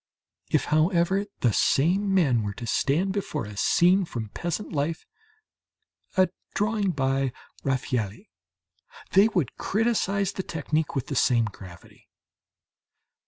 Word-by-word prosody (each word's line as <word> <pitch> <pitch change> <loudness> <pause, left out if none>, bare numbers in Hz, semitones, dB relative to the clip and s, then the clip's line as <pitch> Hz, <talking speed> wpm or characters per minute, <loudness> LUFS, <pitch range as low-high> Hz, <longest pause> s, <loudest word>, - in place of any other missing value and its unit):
If, - - +2
however, 175 +5 +2
the 120 -4 +3
same 185 - +2
men 145 -12 +3
were 100 -1 -4
to 120 - -7
stand 160 - +1
before 190 - -3
a 105 0 -9
scene 180 - +4
from 115 - -5
peasant 175 - -4
life 155 +3 -2 1.1
a 185 -1 +5 0.3
drawing 210 -1 +1
by 135 -4 0 0.3
Raffaëlli 125 - -2 0.8
they 200 +2 +6
would 180 - -1
criticize 200 -3 0
the 190 - -4
technique 155 -3 -2
with 135 -1 -1
the 140 - -5
same 120 -3 +3
gravity. 95 -4 -12
160 Hz, 120 wpm, -26 LUFS, 130-195 Hz, 1.1 s, they